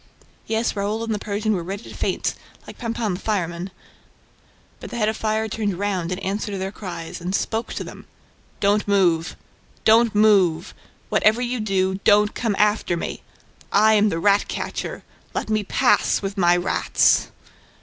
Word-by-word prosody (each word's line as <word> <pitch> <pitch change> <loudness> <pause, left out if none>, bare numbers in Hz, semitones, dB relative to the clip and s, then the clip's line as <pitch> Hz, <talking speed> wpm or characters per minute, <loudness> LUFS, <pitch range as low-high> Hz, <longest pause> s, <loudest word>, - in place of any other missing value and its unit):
Yes, 225 +1 0
Raoul 210 +3 -2
and 225 -1 -2
the 210 - -2
Persian 210 +1 -1
were 180 - -1
ready 195 +5 -6
to - - -11
faint, - - -1 0.3
like - - -12
Pampin 230 -4 -2
the 180 - -5
fireman. 180 -4 -2 1.1
But - - -9
the 240 - -6
head 215 -2 +2
of 220 - -2
fire 220 0 -1
turned 205 -4 -2
round 190 -3 -2
in 180 - -2
answer 200 +2 -3
to 200 - -3
their 190 +1 -3
cries, 175 -5 -7
and 180 +3 -2
spoke 225 +3 -2
to - - -3
them: - - -11 0.5
"Don't 205 +1 +2
move! 175 -5 +2 0.5
Don't 225 0 +5
move!... 195 -5 +3 0.4
Whatever 220 +3 +3
you 245 0 -2
do, 190 -2 0
don't 210 0 +4
come 225 -4 -1
after 210 -4 +2
me!... - - -5 0.5
I 215 +2 +5
am 210 0 +4
the 165 - -2
rat 200 +4 +3
catcher!... - - -5 0.3
Let - - -2
me 215 -1 +1
pass, 245 +5 +2
with 195 0 -3
my 175 -3 +4
rats! 175 +2 +2
205 Hz, 170 wpm, -22 LUFS, 190-220 Hz, 1.1 s, Don't